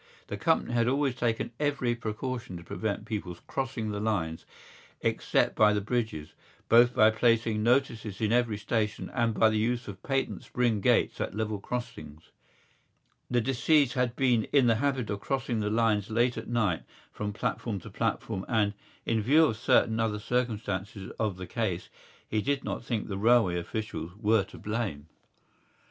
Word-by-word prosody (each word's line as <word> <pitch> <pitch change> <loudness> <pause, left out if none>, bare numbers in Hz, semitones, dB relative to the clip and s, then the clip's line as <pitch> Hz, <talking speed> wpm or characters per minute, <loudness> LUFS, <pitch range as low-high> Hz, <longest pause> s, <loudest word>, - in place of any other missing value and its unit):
The - - -3
company - - +1
had 120 -1 +2
always 135 0 +1
taken 120 -2 -1
every 140 -5 +1
precaution 120 -2 -4
to 85 - -10
prevent 105 +3 -3
people 100 -6 -4
crossing 130 -5 -3
the 105 - -3
lines 95 -7 -2 0.5
except - - +1
by 105 -1 +5
the 105 - +1
bridges, 105 -8 -3 0.4
both 120 +1 +6
by 110 0 +6
placing 115 -1 +2
notices 115 -4 +1
in 110 -1 +1
every 120 -3 +2
station 105 0 -2
and 115 -2 +1
by 110 +2 +4
the 110 - +1
use 120 +2 -1
of 95 -2 -8
patent 135 -1 -1
spring 120 -4 0
gates - - +2
at - - -3
level 110 -1 -2
crossings. 115 -9 -6 1.0
The 120 -1 +2
deceased 135 +2 +3
had 125 -2 0
been 125 -5 +2
in 140 -3 +3
the 115 -2 +4
habit 135 -6 0
of 100 - -2
crossing 130 -1 -2
the 105 -1 0
lines 110 -1 +1
late 120 +2 +2
at - - -6
night 110 -8 +1 0.3
from 105 0 -4
platform 105 +1 -2
to - - -11
platform 95 - -2
and, 105 -3 +1 0.3
in 115 -1 +1
view 150 +9 +5
of 115 - 0
certain 110 0 +3
other 110 -2 0
circumstances 105 -4 -2
of 105 -4 -1
the 95 - -6
case, 100 -5 -2 0.4
he 110 - 0
did 140 +3 -1
not - - -4
think 120 -3 -2
the 95 -2 -4
railway 110 -5 +4
officials 85 -3 -5
were 110 -1 +3
to - - -13
blame. 105 -9 -3
110 Hz, 170 wpm, -29 LUFS, 105-120 Hz, 1.0 s, both